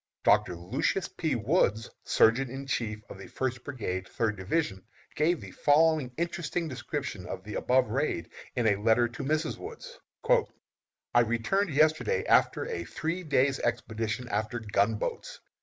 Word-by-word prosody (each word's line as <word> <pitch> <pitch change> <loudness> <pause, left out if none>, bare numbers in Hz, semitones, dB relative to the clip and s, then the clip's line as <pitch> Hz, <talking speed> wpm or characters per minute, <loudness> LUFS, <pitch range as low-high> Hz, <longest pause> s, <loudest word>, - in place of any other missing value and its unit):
Doctor 90 - +4
Lucius 90 - -1
P. 160 -5 -1
Woods, 115 - +1 0.2
Surgeon 120 +4 +4
in 135 +2 -6
Chief 110 -5 -2
of - - -10
the 100 - -9
First 130 -2 -3
Brigade, 95 -9 -4
Third 110 -2 -1
Division, 95 - -1 0.3
gives 165 +3 +1
the - - -9
following 150 -2 +3
interesting 170 0 -2
description 140 - -5
of 95 0 -6
the 105 +1 -7
above 125 -3 +2
raid 130 - -1 0.2
in 120 - 0
a 105 -2 +4
letter 115 +2 +4
to 120 - -7
Mrs. 155 +3 -1
Woods: 480 +3 -9 1.1
"I 120 - +6
returned 120 - +1
yesterday 155 +2 +2
after - - +3
a 85 - -3
three 165 - -3
days' 140 -4 +2
expedition 115 0 -2
after 110 +2 -1
gunboats! 105 0 -1
125 Hz, 145 wpm, -29 LUFS, 105-155 Hz, 1.1 s, I